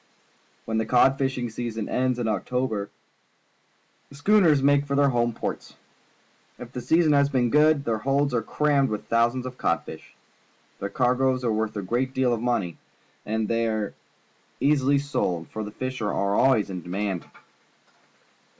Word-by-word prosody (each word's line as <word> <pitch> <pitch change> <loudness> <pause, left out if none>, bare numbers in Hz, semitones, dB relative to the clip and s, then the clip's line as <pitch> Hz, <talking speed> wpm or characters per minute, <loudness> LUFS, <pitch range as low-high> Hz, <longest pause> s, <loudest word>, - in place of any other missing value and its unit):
When 110 0 -1
the 110 - 0
cod 130 +2 +4
fishing 130 -3 -1
season 115 -2 -4
ends 130 -1 0
in 120 -2 -2
October, 110 -2 -2 1.2
the 140 - -14
schooners 160 -3 +4
make 145 0 +3
for 140 - -1
their 140 0 +4
home 120 -2 +1
ports. - - -6 0.8
If 120 -1 -10
the 125 - -5
season 160 +5 +3
has 140 0 +3
been 125 -4 +1
good, 150 -1 +4
their 110 -2 -1
holds 140 +3 0
are 120 - +1
crammed 140 +3 +1
with 105 -1 -4
thousands 120 +2 +1
of 130 0 -8
codfish. - - -3 0.6
The 100 - -3
cargoes 130 +3 +1
are 115 - +1
worth 110 0 -2
a 100 - -3
great 125 +7 -2
deal 130 -2 +2
of 115 - -2
money, 115 -9 -1 0.5
and 110 0 -1
thej^ 115 0 0
are 110 -2 -2 0.7
ea.sily 140 -1 +3
sold, 90 - -2
for 110 - -5
the 105 - -6
fish 130 +3 -5
are 105 - -1
always 105 +2 +2
in 90 -1 -5
demand. 95 +1 -4
125 Hz, 160 wpm, -25 LUFS, 110-135 Hz, 1.2 s, cod